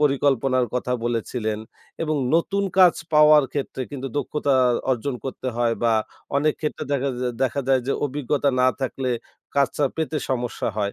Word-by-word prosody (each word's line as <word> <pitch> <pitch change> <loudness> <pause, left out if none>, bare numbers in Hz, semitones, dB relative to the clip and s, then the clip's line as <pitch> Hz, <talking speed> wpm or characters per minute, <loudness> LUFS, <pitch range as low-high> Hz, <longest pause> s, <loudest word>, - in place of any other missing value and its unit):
পরিকল্পনার 135 -3 +2
কথা 125 0 -1
বলেছিলেন। 115 -2 -2 0.4
এবং 155 -1 0 0.2
নতুন 200 +4 +1 0.2
কাজ 180 -2 +7 0.2
পাওয়ার 150 -1 +7
ক্ষেত্রে 135 -2 -3
কিন্তু 135 -1 -5
দক্ষতা 145 -1 0 0.4
অর্জন 130 +2 -1
করতে 130 -1 -4
হয়, 120 -1 +2
বা 115 -1 +3 0.4
অনেক 150 +1 +2
ক্ষেত্রে 150 - -3
দেখাজ 140 -1 0 0.3
দেখা 130 +2 +1
যায় 130 -1 +4
যে, 140 - +1
অভিজ্ঞতা 145 0 0
না 130 - +5
থাকলে 130 0 -2 0.5
কাজটা 140 +1 +2
পেতে 160 -1 -1
সমস্যা 120 -2 -1
হয়। 100 -1 -1
135 Hz, 150 wpm, -23 LUFS, 125-150 Hz, 0.5 s, কাজ